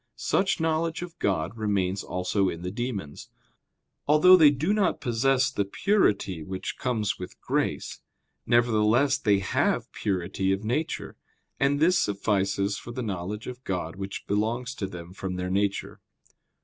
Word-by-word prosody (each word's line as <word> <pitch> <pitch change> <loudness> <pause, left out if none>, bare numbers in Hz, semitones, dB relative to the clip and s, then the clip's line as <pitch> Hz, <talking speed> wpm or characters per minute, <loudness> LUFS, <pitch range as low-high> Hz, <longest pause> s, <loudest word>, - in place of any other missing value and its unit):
Such 190 -2 +1
knowledge 165 +1 0
of 170 -1 -10
God 95 0 0
remains 100 -3 0
also 90 +2 0
in 85 +1 -6
the 90 - -3
demons. 105 - -5 0.8
Although 155 +5 +7
they 160 -5 +7
do 150 +8 0
not 210 -2 +1
possess 130 +3 +2
the 100 - 0
purity 100 - +1
which 95 +4 -5
comes 110 -6 -1
with 90 - -8
grace, - - -2 0.5
nevertheless 120 +4 +3
they 105 -6 +3
have 95 - 0
purity 95 0 -1
of 95 +2 -3
nature; 135 +9 -2 0.4
and 140 +1 +2
this 175 +3 +4
suffices 100 0 0
for 120 - -9
the 125 +1 -4
knowledge 100 +1 -4
of 125 0 -8
God 90 -5 -3
which 100 0 -6
belongs 115 +5 -1
to 100 - -4
them 90 -1 -9
from 95 -1 -4
their 90 0 -3
nature. 100 +1 -1
105 Hz, 150 wpm, -27 LUFS, 95-135 Hz, 0.8 s, Although